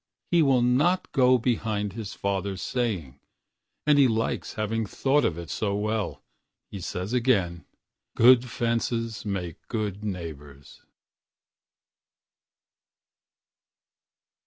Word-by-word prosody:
He 170 -1 +5
will 135 -5 +4
not 150 +10 +2
go 130 -2 +5
behind 110 -4 -1
his 110 -2 -6
father's 100 -1 -2
saying, 95 - -2 0.7
And 150 -1 +5
he 135 - +7
likes 115 -1 -1
having 110 0 -1
thought 140 +7 +1
of 80 - 0
it 85 -1 -7
so 100 -2 -1
wellHe 110 +1 -2 0.6
says 90 +5 -4
again, 100 -9 +1 0.5
"Good 125 +1 +6
fences 115 0 -2
make 90 -5 -4
good 105 -3 -3
neighbors." 75 -8 -7
110 Hz, 100 wpm, -26 LUFS, 95-125 Hz, 0.7 s, he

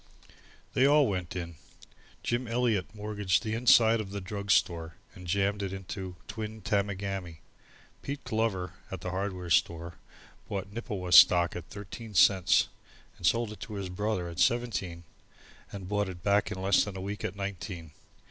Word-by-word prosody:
They 130 - +4
all 145 -1 +5
went 90 -4 -3
in. 85 -3 -5 0.7
Jim 120 +1 -1
Eliot 115 -5 0
mortgaged 105 -3 0
the 110 - -2
inside 115 -1 +5
of 100 - -7
the 100 +1 -4
drug 100 +1 -6
store 85 -3 +2 0.2
and 90 -1 -11
jammed 100 +3 +1
it 95 -2 -3
into 95 -1 -6
Twin 110 -1 -6
Tamagami. 100 -5 -2 0.6
Pete 140 0 -5
Glover 100 -6 -1 0.2
at 95 -3 -6
the 90 - -4
hardware 95 -2 -3
store 85 +2 +1 0.5
bought 100 -1 -4
Nippewa 105 -6 -4
stock 85 -1 +7
at 90 -2 -7
thirteen 105 +3 -9
cents 95 0 +5 0.5
and 85 - 0
sold 115 -2 +2
it 105 - -10
to 120 -6 -7
his 95 -2 -4
brother 95 -1 -2
at 85 0 -7
seventeen 95 -5 0 0.7
and 95 -2 -7
bought 105 0 0
it 85 -2 -9
back 100 0 +2
in 100 - -4
less 95 0 +4
than 100 -2 -6
a - - -5
week 100 0 -5
at 95 - -3
nineteen. 95 -4 -5
100 Hz, 165 wpm, -29 LUFS, 90-105 Hz, 0.7 s, stock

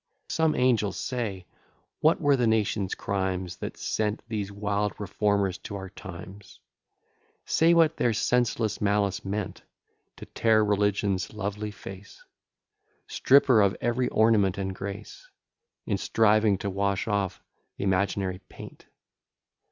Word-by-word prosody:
Some 160 -1 +1
angel, 115 -6 +2
say, 100 -4 -4 0.5
what 155 +2 +3
were 145 -3 +3
the 125 -3 +1
nation's 105 -3 0
crimes, 95 -2 -2
That - - -6
sent 105 0 -2
these 105 -3 -3
wild 100 0 -2
reformers 100 -1 0
to 100 - -7
our 95 -1 -7
times: 95 +1 -11 0.9
Say 165 +1 +4
what 165 -1 +4
their 120 - +2
senseless 115 -1 0
malice 100 0 +1
meant, 100 +1 -4 0.5
To - - -10
tear 110 -1 +2
religion's 100 -2 0
lovely 105 +1 -3
face: 100 -1 -11 0.8
Strip 140 +2 +4
her 120 -5 +5
of 100 -1 +2
every 120 +1 0
ornament 105 -3 +3
and 95 -1 -3
grace; 100 - -8 0.6
In 100 -4 -1
striving 110 -2 +3
to 100 - -3
wash 100 +1 -1
off 100 -4 -1 0.3
th'imaginary 95 -1 0
paint? - - -12
105 Hz, 125 wpm, -27 LUFS, 95-110 Hz, 0.9 s, her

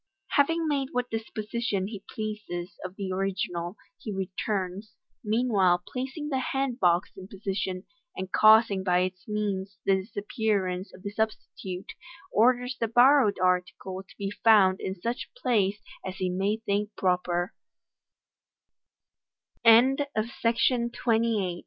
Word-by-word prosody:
Having 325 +3 +2
made 280 -3 0
what 250 0 -1
disposition 220 -2 -2
he 200 -1 -7
pleases 210 -5 -5
of 185 0 -6
the 195 -2 -4
original, 185 -1 -2 0.2
he 215 - -6
returns, 190 +1 -3 0.3
meanwhile 210 -6 +2
placing 270 +4 -4
the 265 -3 0
hand 265 -1 -2
box 175 -1 +2
in 190 -1 -10
position, 190 -1 -3 0.3
and 190 0 -5
causing 215 -2 +6
by 180 -1 +3
its 185 0 -4
means 200 -2 -2
the 195 - +4
disappearance 200 -2 -2
of 185 - -15
the 200 - -4
substitute, 205 -3 -4 0.4
orders 250 +3 +3
the 230 - +1
borrowed 245 -1 +5
article 180 +1 0
Id 190 - -13
be 200 0 -3
found 205 -4 +5
in 190 - -3
such 235 +6 -3
place 210 - +1 0.2
as 190 -1 -5
he 185 -2 -1
may 195 +4 0
200 Hz, 115 wpm, -27 LUFS, 185-225 Hz, 0.4 s, causing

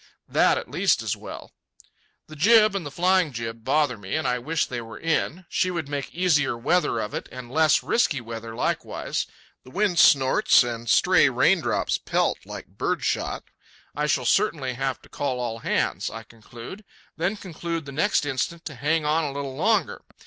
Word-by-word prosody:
That - - +3
at - - -5
least - - +2
is - - -1
well. - - -10 0.7
The 155 - -12
jib 215 +5 +5
and 165 -7 -4
flying 180 -1 +2
jib 115 -1 -6
bother 145 -4 +1
me, 95 -2 -4
and 155 - -1
I 125 0 0
wish 160 +6 -1
they 120 -2 -5
were 115 -1 -10
in. 165 +2 -1
She 185 - 0
would 170 -5 -3
make 145 -1 -4
easier 155 -8 +1
weather 130 0 +1
of 105 - -4
it, - - -5
and 125 -1 -9
less 155 +1 +3
risky 165 - +1
weather 115 -1 -7
likewise. - - -2 0.4
The - - -14
wind 190 +3 +1
snorts, 135 -1 +5
and 120 -1 -5
stray - - +5
raindrops - - +1
pelt - - -1
like - - -10
birdshot. - - -1 0.5
I 150 0 -1
shall 135 -3 +1
certainly 135 - +1
have 135 +1 -2
to - - -16
call 135 -3 -3
all 115 -2 -3
hands, - - -1
I 115 - -8
conclude; 115 - -11 0.3
then 180 +6 -1
conclude 170 -4 -5
the 140 - -8
next 160 +3 +1
instant 145 +5 -3
to 155 - -6
hang 150 +4 0
on 155 +2 +2
a 145 - -2
little 140 -1 -5
longer. 200 +3 +1
145 Hz, 180 wpm, -24 LUFS, 125-170 Hz, 0.7 s, jib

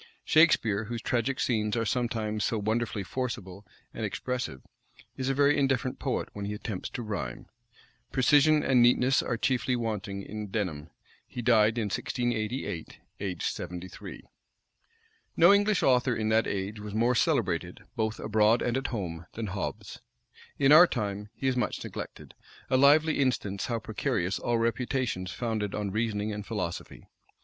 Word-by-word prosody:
Shakspeare, 115 -10 +4
whose 115 +1 -5
tragic 125 +2 0
scenes 110 -2 0
are 115 - 0
sometimes 110 -3 -1
so 115 - 0
wonderfully 110 -1 -1
forcible 100 -4 -5 0.3
and - - -5
expressive, 125 - -3 0.5
is 130 0 -2
a 135 - +1
very 145 +1 +4
indifferent 135 -2 0
poet - - -2
when 100 -1 -5
he 105 +1 -3
attempts 105 -2 -5
to 120 - -3
rhyme. 100 - -5 0.7
Precision 150 +3 +4
and 130 -2 +4
neatness 125 +2 +4
are 120 - -2
chiefly 125 0 +1
wanting 105 -4 -3
in 105 +1 -6
Denham. 90 -7 -3 0.4
He 120 - -6
died 115 -1 +4
in 115 - +1
1688, 120 -5 -3 0.2
aged 95 -4 -4
seventy 90 +1 -4
three. - - -10 1.1
No 175 +4 +7
English 205 0 +3
author 125 -1 +3
in 110 -1 -1
that 110 +1 +3
age 100 +2 -3
was 105 0 -7
more 120 +3 +3
celebrated, 120 - 0
both 110 0 -1
abroad 110 +2 +3
and 120 +1 0
at 135 0 -2
home, 85 -8 -5
than 110 -2 -4
Hobbes: 95 - -5 0.6
in 135 0 +4
our 165 +4 +9
time, 105 -5 -3
he 135 - -2
is 130 - +2
much 125 - -1
neglected; - - -8 0.4
a - - +4
lively 150 +4 +5
instance 105 -7 0
how 120 - -1
precarious 100 -4 -2
all 120 -1 0
reputations 115 -4 -1
founded 110 -1 -2
on 105 -2 -2
reasoning 110 -1 -1
and 105 0 -5
philosophy. 105 -7 -5
115 Hz, 155 wpm, -28 LUFS, 105-125 Hz, 1.1 s, our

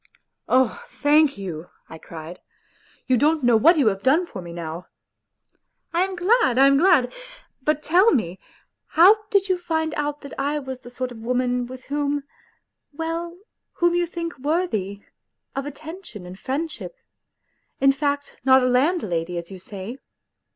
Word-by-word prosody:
" - - -57
Oh, 255 -2 +2
thank 295 -2 +3
you," 175 -4 -6 0.2
I 160 - -11
cried; 165 +2 -10 0.3
" - - -33
you 255 - +3
don't 300 +3 +2
know 240 -1 +5
what 325 +10 +5
you 285 - +3
have 195 -1 -4
done 300 - +3
for 195 - -8
me 170 -1 -9
now! 170 0 -6 0.3
" - - -45
" - - -49
I 340 - +2
am 380 0 -3
glad! 370 - +3
I 270 - +7
am 275 0 +5
glad! 290 -6 +4 0.5
But 300 +2 0
tell 370 +7 +5
me 185 -8 -1 0.5
how 410 +6 +5
did 400 -2 +2
you 370 -2 +1
find 320 -2 -1
out 295 0 -3
that 280 - -10
I 285 +2 0
was 265 -3 -6
the 245 - -11
sort 250 0 -4
of 235 - -10
woman 250 +1 -1
with 255 +1 -10
whom... 290 0 -1 0.7
well, 330 +3 -4 0.4
whom 345 0 +2
you 350 0 +1
think 335 -3 -6
worthy... 240 - -1 0.5
of 275 +1 -3
attention 305 - -9
and 180 +2 -10
friendship... 305 - -4 0.8
in 275 0 +5
fact, 285 +1 -2
not 260 0 +6
a - - +3
landlady 245 - 0
as 170 +2 -6
you 190 - -8
say 200 +6 -8
275 Hz, 170 wpm, -23 LUFS, 230-325 Hz, 0.8 s, I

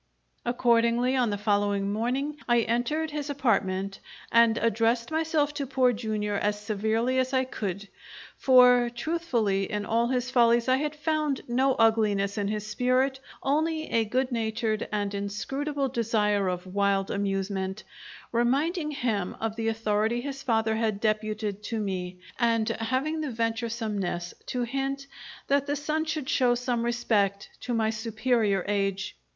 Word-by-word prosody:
Accordingly, 240 +1 +2
on 250 -3 +2
the 205 - -1
following 205 -1 +1
morning, 260 +7 -1
I 240 -1 +4
entered 245 +8 -1
his 295 -1 -4
apartment 195 -8 0 0.3
and 230 -1 +5
addresses 230 +3 +1
myself 315 -2 +1
to 280 -2 -3
Poor 255 -1 +3
Jr. 215 -2 -2
as 205 0 0
severely 220 +4 0
as 260 +1 0
I 260 0 +3
could 205 -5 -4 0.5
(for, 250 -2 +6
truthfully, 235 - -1
in 210 -1 -2
all 230 +2 +1
his 255 0 -1
follies 235 -1 +4
I 260 0 +4
had 300 +2 -2
found 305 -2 -1
no 260 +2 +2
ugliness 210 -3 +2
in 200 - 0
his 210 0 -3
spirit 255 +4 +1 0.2
only 315 +3 0
a 230 - +3
good 255 +4 -1
natured 220 -1 -1
and 205 -1 -1
inscrutable 270 +9 -2
desire 210 -5 +1
of 180 0 -2
wild 195 0 0
amusement) 195 0 -2 0.5
reminding 290 +8 +1
him 225 -10 -2
of 220 -1 -2
the 225 0 -2
authority 225 +1 0
his 275 +1 -5
father 225 -3 +1
had 220 -3 0
deputed 215 -1 -1
to 225 0 -2
me, 185 -3 -3 0.2
and 230 -2 +2
having 265 +7 -1
the 300 - -2
venturesomeness 225 -6 -2
to 250 -1 -1
hint 270 +3 -2 0.4
that 280 0 +1
the 290 - 0
son 305 +2 -1
should 310 -4 -3
show 250 -3 +3
some 245 -1 -1
respect 215 -5 0
to 245 - -3
my 220 -1 +1
superior 220 -3 0
age. 195 -1 -1
230 Hz, 145 wpm, -27 LUFS, 210-260 Hz, 0.5 s, for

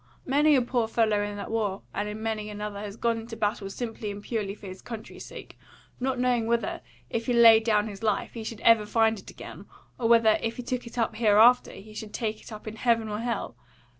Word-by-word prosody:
Many 295 +3 +4
a 255 - +3
poor 240 -2 0
fellow 220 -2 +2
in 205 0 -4
that 200 - -6
war 210 -4 -1
and 205 +1 -2
in 215 +1 -6
many 215 -1 -2
another 210 -1 -5
has 205 -1 -6
gone 230 -1 0
into 225 0 -8
battle 205 -1 -1
simply 225 0 -5
and 205 0 -7
purely 210 -4 -3
for 210 - -14
his 185 -1 -8
country's 225 -3 -8
sake, - - -11 0.4
not 260 0 -1
knowing 245 -2 +1
whether, 235 0 -1 0.3
if 230 +1 -2
he 245 - +2
laid 225 -2 +7
down 215 -2 +2
his 200 -1 -8
life, 215 -2 -1
he 230 - -6
should 220 0 -7
ever 225 -2 +5
find 225 0 +2
it - - -13
again, - - -10 0.3
or 230 -2 +1
whether, 230 -2 +5
if 230 0 -3
he 250 - -5
took 245 0 -3
it 235 - -11
up 225 -2 0
hereafter, 225 +2 +5
he 210 +2 -12
should 215 0 -7
take 220 -2 -3
it - - -13
up 215 0 -9
in 215 +1 -6
heaven 230 -2 +1
or 210 0 -3
hell. 230 - -3
225 Hz, 230 wpm, -27 LUFS, 210-235 Hz, 0.4 s, laid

